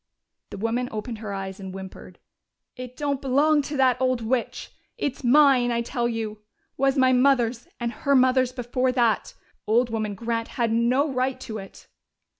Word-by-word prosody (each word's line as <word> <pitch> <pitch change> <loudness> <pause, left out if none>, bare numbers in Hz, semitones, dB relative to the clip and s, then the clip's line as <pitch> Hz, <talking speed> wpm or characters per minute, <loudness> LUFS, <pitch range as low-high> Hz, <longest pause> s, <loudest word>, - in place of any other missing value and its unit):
The - - -8
woman 230 +4 -1
opened 220 +1 -5
her 215 -2 -6
eyes 195 -1 -5
and 190 -1 -7
whimpered. 190 -1 -10 0.6
"It 250 -1 -9
don't 285 -2 -2
belong 290 +3 +3
to 290 +1 -5
that 260 -1 +3
old 255 -1 +1
witch! 235 +1 -2 0.3
It's 285 - -3
mine, 255 -1 +5
I 235 0 0
tell 240 -1 -1
you! 220 -2 -4 0.4
Was 270 +1 +1
my 260 -1 +4
mother's, 250 -2 +2
and 235 -1 -2
her 280 +3 0
mother's 255 -1 +3
before 255 0 -1
that. 235 -4 +1 0.3
Old 235 +2 +2
woman 215 -2 -2
Grant 230 +2 -3
had 235 -2 +1
no 240 +6 +2
right 255 +1 -1
to 220 -2 -6
it." 195 - -12
245 Hz, 170 wpm, -24 LUFS, 225-260 Hz, 0.6 s, mine